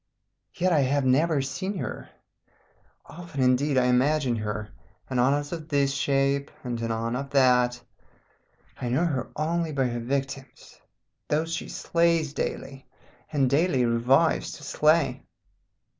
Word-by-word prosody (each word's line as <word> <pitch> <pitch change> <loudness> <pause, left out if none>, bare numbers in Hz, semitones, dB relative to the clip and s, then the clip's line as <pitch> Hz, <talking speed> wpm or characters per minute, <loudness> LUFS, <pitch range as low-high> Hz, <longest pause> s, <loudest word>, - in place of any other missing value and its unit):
"Yet 185 0 +1
I 155 - +4
have 140 0 +1
never 140 +2 +2
seen 190 +8 -4
her. - - -6 1.0
Often, 165 -5 -5
indeed, 130 +2 +2
I 125 - +4
imagine 130 +1 +2
her, 105 0 -4 0.4
anon 130 +2 +3
as 145 0 -4
of 160 -2 -6
this 140 -2 +1
shape, 140 -1 +1
and 120 -2 -4
anon 115 +1 -2
of 140 +2 -4
that. 125 -3 +3 1.0
I 120 - -2
know 130 +8 +1
her 135 -7 -2
only 165 +1 -1
by 135 -3 0
her 120 0 -3
victims, 135 +2 -5 0.5
those 160 +2 -1
she - - -4
slays 165 -3 +1
daily, 135 -2 -5 0.4
and 140 -3 +2
daily 140 -2 +2
revives 125 +7 +2
to 150 - -11
slay. 155 +2 +2
140 Hz, 135 wpm, -26 LUFS, 125-155 Hz, 1.0 s, I